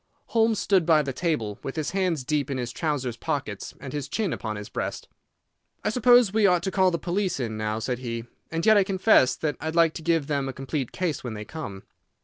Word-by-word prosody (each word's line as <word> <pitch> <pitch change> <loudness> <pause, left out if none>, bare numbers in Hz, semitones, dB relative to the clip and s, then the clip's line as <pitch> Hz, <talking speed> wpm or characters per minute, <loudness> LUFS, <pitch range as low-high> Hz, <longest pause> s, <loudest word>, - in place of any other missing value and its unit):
Holmes 225 -1 +3
stood 195 -3 +3
by 160 -2 +4
the 135 -2 -3
table, 125 - -2
with 135 - -5
his 155 -2 -2
hands 180 -7 0
deep 145 +1 -1
in 135 - -2
his 120 -2 -3
trouser's 130 -4 -2
pockets - - -4
and - - -8
his 145 -2 -3
chin 205 -3 -1
upon 110 -2 -4
his 105 0 -6
breast. - - -4 0.8
"I - - +1
suppose 245 -3 +5
we 215 -2 +4
ought 180 -2 +3
to 190 - -1
call 185 0 +4
the 170 - -1
police 180 +1 -1
in 115 -4 -2
now," 110 0 -2
said 125 +2 -2
he. 115 -2 -4 0.2
"And 165 +1 -2
yet 220 -1 +7
I 200 - +5
confess 190 - +4
that 150 -2 -2
I'd 160 +1 -3
like 165 -1 +4
to - - -7
give 165 -2 +1
them 140 -2 -1
a - - -5
complete 135 0 -3
case 175 -5 -2
when 120 -3 -5
they 105 0 -6
come." 100 -10 -7
155 Hz, 230 wpm, -26 LUFS, 125-185 Hz, 0.8 s, yet